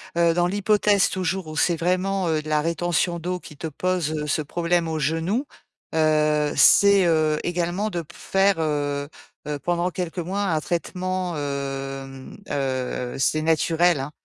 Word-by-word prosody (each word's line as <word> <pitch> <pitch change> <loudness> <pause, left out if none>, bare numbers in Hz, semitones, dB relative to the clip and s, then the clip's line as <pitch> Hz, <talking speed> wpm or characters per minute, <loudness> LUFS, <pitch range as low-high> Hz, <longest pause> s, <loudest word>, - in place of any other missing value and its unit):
heu, 170 -1 +3
dans 175 0 +2
l'hypothèse, 205 +1 +2
toujours, 185 -1 -2
où 155 0 -7
c'est 170 +3 +3
vraiment, 185 +2 0
heu, 155 -1 +1
de 155 - -7
la 150 -1 +2
rétention 170 +1 0
d'eau 180 +2 -3
qui 150 - -13
te 165 - -6
pose, 175 +1 -1
heu, 150 -1 -3
ce 155 +1 0
problème 170 +2 0
au 160 -1 -2
genou. 165 - 0 0.5
Heu, 150 -1 +2
c'est, 200 -2 +6
heu, 155 -2 +2
également 175 +4 -1
de 170 -4 -3
p 170 - -17
faire, 195 -2 +1
heu, 145 -2 -1 0.4
heu, 150 -1 -2
pendant 175 +4 0
quelques 180 -1 -4
mois, 190 +4 -2
un 165 -6 0
traitement, 180 +1 -2
hem, 135 -2 -5
heu, 130 -2 -2
heu, - - -6
c'est 145 +4 +1
naturel, 165 +1 +2
hein. 135 +2 -5
165 Hz, 170 wpm, -23 LUFS, 150-180 Hz, 0.5 s, c'est